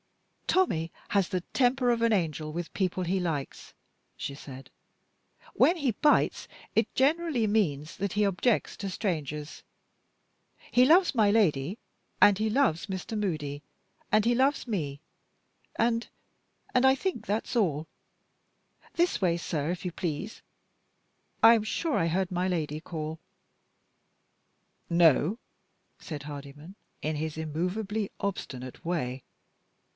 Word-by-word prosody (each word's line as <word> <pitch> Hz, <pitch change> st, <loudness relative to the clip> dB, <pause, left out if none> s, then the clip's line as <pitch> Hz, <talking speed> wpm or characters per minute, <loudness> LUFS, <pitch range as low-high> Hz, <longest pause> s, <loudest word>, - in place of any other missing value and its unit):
"Tommie 170 Hz, -, +2 dB, 0.2 s
has 200 Hz, -3 st, +2 dB
the 185 Hz, -2 st, -1 dB
temper 250 Hz, -1 st, +3 dB
of 235 Hz, -1 st, 0 dB
an 230 Hz, 0 st, +3 dB
angel 160 Hz, -6 st, 0 dB
with 170 Hz, +2 st, -3 dB
the -, -, -20 dB
people 185 Hz, -1 st, -1 dB
he 185 Hz, +2 st, 0 dB
likes," 155 Hz, -6 st, -4 dB, 0.5 s
she 140 Hz, -, -4 dB
said. 135 Hz, -1 st, -10 dB, 0.8 s
"When 350 Hz, -, +4 dB
he 280 Hz, -6 st, +1 dB
bites, 295 Hz, +7 st, +2 dB, 0.3 s
it -, -, +2 dB
generally 290 Hz, -3 st, +2 dB
means 165 Hz, -8 st, 0 dB
that 200 Hz, -1 st, -2 dB
he 210 Hz, 0 st, +2 dB
objects 200 Hz, +4 st, +1 dB
to 200 Hz, -, -4 dB
strangers. 150 Hz, -, -3 dB, 1.1 s
He 250 Hz, -, +6 dB
loves 335 Hz, +1 st, +5 dB
my 215 Hz, -3 st, +4 dB
Lady, 180 Hz, -4 st, +2 dB, 0.4 s
and 205 Hz, -2 st, +7 dB
he 215 Hz, +1 st, 0 dB
loves 215 Hz, -, +1 dB
Mr. 190 Hz, +3 st, -4 dB
Moody, 155 Hz, -8 st, -2 dB, 0.5 s
and 215 Hz, 0 st, +4 dB
he 240 Hz, +1 st, +3 dB
loves 270 Hz, +2 st, +2 dB
me, 150 Hz, -11 st, -3 dB, 0.8 s
and 230 Hz, 0 st, +1 dB, 0.6 s
and 255 Hz, +1 st, +4 dB
I 265 Hz, 0 st, +6 dB
think 275 Hz, -, -3 dB
that's 215 Hz, +5 st, -2 dB
all. 160 Hz, -9 st, +1 dB, 1.1 s
This 345 Hz, -9 st, +1 dB
way, 170 Hz, -3 st, +2 dB
sir, 160 Hz, -3 st, -2 dB
if 180 Hz, +1 st, -5 dB
you 180 Hz, -, -1 dB
please, 170 Hz, +5 st, -4 dB, 1.0 s
I 225 Hz, +1 st, +10 dB
am 225 Hz, -2 st, +2 dB
sure 300 Hz, +8 st, -1 dB
I 165 Hz, -, +2 dB
heard 185 Hz, +2 st, 0 dB
my 180 Hz, +1 st, 0 dB
Lady 155 Hz, -3 st, -2 dB
call." 160 Hz, -1 st, -5 dB, 1.7 s
"No," 170 Hz, -, +4 dB, 0.6 s
said 150 Hz, -3 st, -7 dB
Hardyman, 145 Hz, +4 st, -9 dB, 0.3 s
in 155 Hz, +1 st, -1 dB
his 155 Hz, 0 st, -3 dB
immovably 185 Hz, +7 st, -2 dB
obstinate 130 Hz, -10 st, -5 dB
way. 135 Hz, -7 st, -2 dB
185 Hz, 130 wpm, -28 LUFS, 155-225 Hz, 1.7 s, I